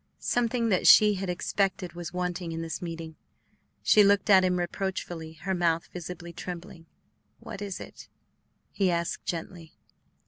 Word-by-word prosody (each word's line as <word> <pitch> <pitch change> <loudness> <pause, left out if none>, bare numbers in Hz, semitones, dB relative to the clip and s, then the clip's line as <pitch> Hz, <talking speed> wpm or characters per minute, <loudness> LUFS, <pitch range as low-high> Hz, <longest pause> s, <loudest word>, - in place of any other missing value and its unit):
Something 235 -1 0
that 185 -4 +2
she 210 -1 +8
had 195 -1 -4
expected 185 0 -1
was 175 -1 -6
wanting 180 -1 -3
in 165 0 -4
this 165 - -5
meeting; 165 -2 -6 0.7
she 210 - +6
looked 200 +1 +3
at 190 -1 +7
him 180 -1 +2
reproachfully, 175 -2 -4
her 190 +4 -3
mouth 170 -2 +1
visibly 175 -1 -7
trembling. 175 -1 -8 0.5
"What 195 - -8
is 200 -2 -4
it?" - - -11 0.6
he 195 -2 +1
asked 170 -1 -2
gently. 165 -1 -6
180 Hz, 145 wpm, -28 LUFS, 170-195 Hz, 0.7 s, she